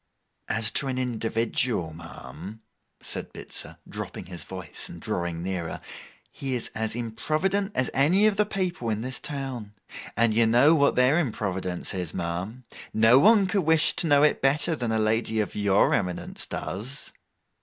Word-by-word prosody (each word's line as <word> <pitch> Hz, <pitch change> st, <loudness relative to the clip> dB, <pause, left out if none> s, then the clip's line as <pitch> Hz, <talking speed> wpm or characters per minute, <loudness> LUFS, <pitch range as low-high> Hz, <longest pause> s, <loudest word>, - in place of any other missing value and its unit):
'As 110 Hz, 0 st, +1 dB
to 135 Hz, -, -1 dB
an 130 Hz, -1 st, -2 dB
individual, 115 Hz, -6 st, 0 dB
ma'am,' 85 Hz, +6 st, -10 dB, 0.4 s
said -, -, -3 dB
Bitzer, -, -, -5 dB
dropping -, -, -6 dB
his 90 Hz, -1 st, -6 dB
voice 95 Hz, -5 st, -5 dB
and -, -, -9 dB
drawing 85 Hz, -1 st, -3 dB
nearer, 90 Hz, -3 st, -3 dB, 0.5 s
'he 135 Hz, -2 st, -3 dB
is 120 Hz, -, -1 dB
as 110 Hz, 0 st, -2 dB
improvident 155 Hz, -, -1 dB
as 125 Hz, -, 0 dB
any 175 Hz, +10 st, +4 dB
of 215 Hz, -2 st, +4 dB
the 210 Hz, +1 st, +2 dB
people 180 Hz, -, -2 dB
in 110 Hz, 0 st, -1 dB
this 130 Hz, +2 st, -3 dB
town. 130 Hz, -7 st, -5 dB, 0.4 s
And 115 Hz, -1 st, +3 dB
you 115 Hz, +1 st, +4 dB
know 125 Hz, +8 st, +6 dB
what 145 Hz, -3 st, +3 dB
their 130 Hz, +6 st, +4 dB
improvidence 95 Hz, -, -2 dB
is, 90 Hz, -4 st, -4 dB
ma'am. 95 Hz, +8 st, -4 dB, 0.3 s
No 110 Hz, +4 st, +6 dB
one 210 Hz, +3 st, +6 dB
could 195 Hz, +1 st, +1 dB
wish 160 Hz, -1 st, +4 dB
to 170 Hz, -, +2 dB
know 145 Hz, -1 st, +5 dB
it 150 Hz, -, +3 dB
better 145 Hz, +4 st, +2 dB
than 120 Hz, -5 st, -2 dB
a 110 Hz, -, +1 dB
lady 110 Hz, +1 st, +1 dB
of 105 Hz, -, -1 dB
your 100 Hz, -1 st, +3 dB
eminence 90 Hz, -3 st, -2 dB
does. 120 Hz, +10 st, -5 dB
115 Hz, 165 wpm, -26 LUFS, 100-145 Hz, 0.5 s, know